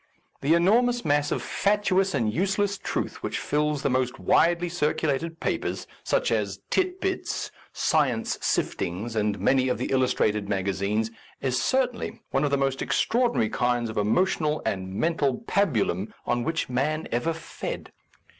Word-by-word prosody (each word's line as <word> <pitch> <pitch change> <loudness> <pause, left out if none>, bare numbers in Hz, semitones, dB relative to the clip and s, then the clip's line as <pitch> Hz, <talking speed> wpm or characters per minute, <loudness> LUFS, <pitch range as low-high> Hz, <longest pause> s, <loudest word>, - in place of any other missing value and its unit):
The 155 +4 +4
enormous 240 +8 +3
mass 145 0 +2
of - - -1
fatuous 195 -3 +1
and 110 -5 +1
useless 195 - +1
truth - - -3
which - - -2
fills 150 -1 0
the - - +2
most 130 -1 0
widely 175 +1 +3
circulated 160 -1 -1
papers, - - -2 0.2
such - - +1
as - - -1
Tit 370 0 +1
Bits^ 380 0 -2 0.2
Science 130 -8 +1
Sif - - 0
tings, 105 +7 -3
and 105 -1 0
many 130 -1 +3
of 125 - 0
the - - -3
illustrated 105 -6 +1
maga 100 -1 0
zines, 105 +4 -1 0.3
is 130 -2 0
certainly 255 -2 0
one 135 - +1
of 145 - +2
the 140 - +2
most 135 -1 0
extraor 240 +1 +2
dinary 110 - 0
kinds 120 -2 +1
of - - -8
emotional 155 - +1
and 95 -4 -2
mental 145 - +1
pabu 170 - +2
lum 95 +5 -3
on 120 0 0
which 160 +3 -1
man 150 +5 -1
ever 125 +8 +1
fed. 165 0 -6
145 Hz, 160 wpm, -26 LUFS, 120-175 Hz, 0.3 s, The